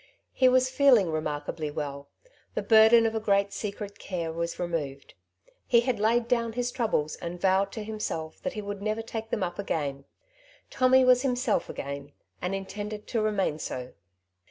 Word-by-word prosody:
He 255 -1 +5
was 255 0 +4
feeling 255 - +5
remarkably 155 0 -3
well. 140 -1 -5 0.5
The - - -1
burden 225 +1 +7
of 225 - +1
a 220 - 0
great 200 -2 +1
secret 205 -1 -5
care 170 -4 -3
was 170 +1 -3
removed. 150 -6 -4 0.5
He 235 -1 +5
had 240 -3 -1
laid 230 +2 +2
down 230 -2 +1
his 245 +1 -1
troubles, 215 - -1
and 175 +1 -6
vowed 190 +1 +2
to 220 - -5
himself 210 -7 -5
that 275 - -3
he 210 - -5
would 200 0 -5
never 215 +2 -2
take 225 0 -6
them 215 - -1
up 175 +2 -4
again. 140 -8 -2 0.7
Tommy 260 0 +4
was 250 -1 +6
himself 250 -3 0
again, 140 +1 -6 0.3
and 180 +2 -1
intended 205 +2 -6
to 230 - 0
remain 195 -7 0
so. 125 -3 -5
205 Hz, 170 wpm, -28 LUFS, 165-230 Hz, 0.7 s, burden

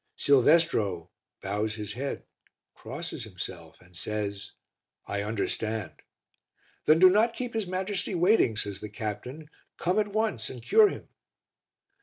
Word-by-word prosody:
Silvestro 125 - +3 0.3
bows 105 +2 -1
his 105 -2 -5
head, 135 +4 -4 0.5
crosses - - -6
himself, - - -8
and 90 0 -21
says 100 +1 -4 0.5
"I 100 0 -2
understand." 110 -2 -2 0.9
"Then 155 - +6
do 185 +3 +8
not 220 +5 +3
keep 245 -2 -4
his 220 -4 -2
Majesty 190 +1 -2
waiting," 175 - +4
says 100 -3 -3
the 105 - -6
captain. 125 +8 -6 0.3
"Come 180 +5 +1
at 210 - +1
once 205 - -1
and 125 -3 -9
cure 430 - +6
him." - - -8
125 Hz, 130 wpm, -28 LUFS, -, 0.9 s, do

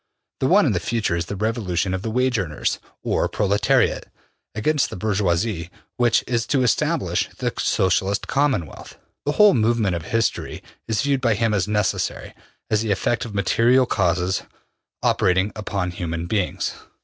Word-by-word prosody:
The - - +1
one - - +5
in - - +2
the - - 0
future 115 -7 -1
is 85 0 -2
the 100 - -4
revolution 95 -4 -1
of 95 - -2
the 110 - -3
wage 125 0 +1
earners, 80 -6 -2 0.2
or - - 0
proletariat, 100 0 +1 0.5
against 145 +7 +1
the - - -7
bourgeoisie, 95 -2 -1 0.3
which 120 -2 +3
is 115 -2 -1
to 135 -1 +2
establish 120 - 0
the - - -2
Socialist 95 +2 +1
Commonwealth. 135 - -1 0.3
The 145 - +2
whole 210 +3 +6
movement 110 -5 +1
of 85 -1 -5
history 115 0 -1 0.2
is 110 -2 0
viewed 140 -2 +1
by 115 -4 +2
him 115 +1 +1
as 100 -1 +1
necessary, 105 0 -1 0.4
as 110 -1 +2
the 110 - -2
effect 110 +4 0
of 110 -3 -8
material 120 +6 +3
causes 90 -4 0 0.6
operating 95 +3 +2
upon 100 -4 -3
human 85 -1 -4
beings. 100 0 -1
105 Hz, 160 wpm, -22 LUFS, 95-115 Hz, 0.6 s, whole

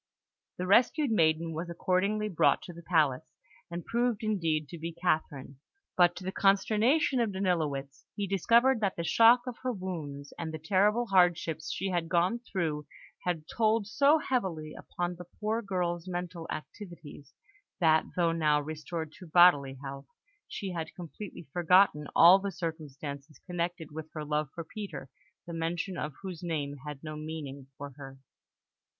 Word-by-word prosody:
The 180 - -2
rescued 245 - +4
maiden 165 -4 +2
was 165 +2 -4
accordingly 195 +5 0
brought 185 -6 +2
to 175 - -9
the 170 - -11
palace, 160 -4 +1 0.3
and 170 0 -6
proved 235 -1 0
indeed 165 -8 0
to 170 - -8
be 165 +2 -4
Catherine; 155 -6 -2 0.4
but, 175 -1 +5
to 180 - -8
the 190 - -3
consternation 215 +9 +3
of 230 -3 +1
Danilowitz, 155 -8 -2
he 205 - -2
discovered 230 +7 +3
that 200 -3 0
the 170 - -3
shock 230 +7 +6
of 250 -2 -6
her 255 - -1
wounds 160 -9 -6
and 160 -1 -3
the 160 - -5
terrible 200 +8 +2
hardships 175 -5 +2
she 195 - -2
had 175 -3 -1
gone 180 +7 +2
through 165 -10 -3 0.4
had 175 -3 -1
told 220 -1 +1
so 280 +8 +4
heavily 190 - -2
upon 175 0 -4
the 180 - -9
poor 220 +2 0
girl's 180 -4 -2
mental 175 -2 -5
activities, 155 -5 -9 0.4
that, 160 -3 +4
though 170 -2 +2
now 155 -3 +2
restored 155 +1 -5
to 180 - -11
bodily 155 -5 +5
health, 135 0 -7 0.4
she 195 -2 -5
had 165 -3 -5
completely 175 0 -9
forgotten 175 -3 +4
all 175 +4 +8
the 200 0 -3
circumstances 150 -3 -6
connected 175 -3 -3
with 155 +1 -7
her 155 -1 -5
love 150 -1 -1
for 170 - -4
Peter, 160 -7 -8 0.3
the 170 - -7
mention 170 +3 -2
of 150 -4 -4
whose 185 -4 -6
name 150 -5 -3
had 150 -1 -7
no 155 -1 -6
meaning 150 -3 -7
for 145 0 -7
her. 135 -1 -10
170 Hz, 160 wpm, -30 LUFS, 155-195 Hz, 0.4 s, all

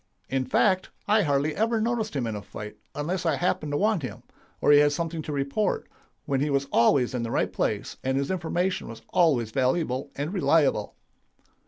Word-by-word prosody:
In 130 -1 0
fact, 185 - +2 0.2
I 210 +1 +4
hardly 145 -2 +1
ever 225 +2 +1
noticed 220 -4 -1
him 130 -4 0
in 110 -2 -3
a 105 - -5
fight 105 +1 -8 0.2
unless 170 +5 -2
I - - +2
happened 155 -4 -1
to - - +1
want 210 -2 +2
him, 130 - -7 0.4
or - - +4
he 145 - +8
had 145 0 +4
something 165 0 -3
to 155 - -6
report, 145 +9 -1 0.4
when 135 -2 0
he 150 - +1
was 140 -1 +1
always 125 +1 +3
in 125 - -1
the 115 - -3
right - - 0
place, - - -2
and 130 +1 0
his 140 +3 -1
information 180 +1 -1
was 115 - -10
always 135 -11 +2
valuable 130 +1 0
and 145 +6 -3
reliable. 155 - +2
145 Hz, 195 wpm, -26 LUFS, 130-180 Hz, 0.4 s, he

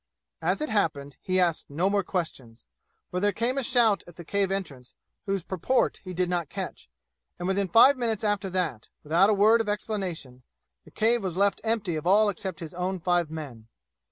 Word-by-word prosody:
As - - 0
it 305 - -2
happened, 145 -9 -1
he 185 0 0
asked 170 -3 +1
no 165 +7 0
more 200 0 +2
questions, 135 - -5 0.5
for 180 - -1
there 205 +2 +2
came 235 +7 -1
a - - -2
shout 235 -4 +3
at 175 - -13
the 170 - -10
cave 200 +2 0
entrance 145 -11 -5 0.3
whose 195 -2 -1
purport 190 +9 0
he 185 - -7
did 180 0 0
not 175 -4 -2
catch, - - -6 0.5
and 175 - -4
within 195 0 +1
five 245 +7 +6
minutes 225 -3 -1
after 205 -2 0
that, 170 -12 -2
without 170 +7 +4
a - - +4
word 220 +3 +5
of 215 - -3
explanation, 185 - -4 0.4
the - - -15
cave 230 +2 +2
was 185 -3 -3
left 200 +1 +2
empty 220 -6 -1
of 155 +3 -4
all 210 +3 +5
except 190 -2 -5
his 165 0 -7
own 180 +1 -2
five 175 -1 +1
men. 140 -9 -8
185 Hz, 195 wpm, -27 LUFS, 165-210 Hz, 0.5 s, five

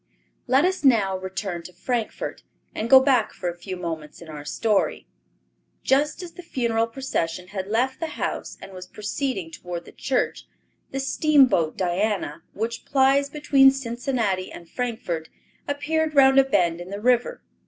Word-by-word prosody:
Let 265 +6 +4
us 375 -2 0
now 215 -8 +4
return 190 -1 -4
to 180 +2 -12
Frankfort, 225 +5 -3 0.3
and 225 - -3
go 265 - +10
back 260 -5 +2
for 180 - -3
a 170 - -6
few 185 +1 -7
moments 160 -4 -6
in 170 - -12
our 150 -1 -7
story. 205 +7 0 0.8
Just 295 +6 +1
as 350 - -8
the 360 - -10
funeral 235 -8 0
procession 180 -9 -3
had 190 -1 -4
left 245 +5 0
the 325 - -2
house - - -3
and 195 - -10
was 185 -1 -9
proceeding 210 - -3
toward 175 0 -7
the - - -12
church, 260 -1 -2 0.4
the 270 - -4
steamboat 270 - +3
Diana, 185 -3 -1
which 225 +3 -3
plies 275 +1 +3
between 280 -2 +5
Cincinnati 240 -7 -2
and 170 - -11
Frankfort, 185 -9 -3 0.4
appeared 305 +2 -1
round 270 -1 +7
a - - +7
bend 175 -9 +1
in 175 - -8
the 200 +1 -5
river. 250 - +1
230 Hz, 160 wpm, -24 LUFS, 180-270 Hz, 0.8 s, go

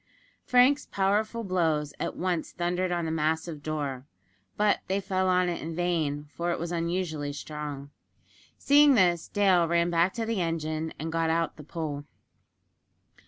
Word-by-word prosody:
Frank's 255 +4 +4
powerful 210 +4 0
blows 160 -6 0
at - - -3
once 175 -3 -2
thundered 180 +1 -1
on 175 -1 -1
the 160 - -2
massive 160 0 -1
door; 145 -4 -4 0.5
but 210 0 +3
they 195 +1 0
fell 190 -1 0
on 180 0 +3
it 175 -1 -2
in 165 +1 -5
vain, 160 -4 -1
for 170 +1 -2
it 170 - 0
was 170 +1 -4
unusually 170 -3 -2
strong. 145 -1 -6 0.7
Seeing 285 0 +6
this, 175 -5 +3
Dale 190 -4 +3
ran 170 +1 +2
back 170 +2 +2
to 230 -1 -2
the 225 -4 -1
engine, 160 -1 -2
and 160 +1 -4
got 165 0 0
out 165 0 0
the 150 - -11
pole. 145 -2 -5
170 Hz, 160 wpm, -28 LUFS, 155-185 Hz, 0.7 s, Seeing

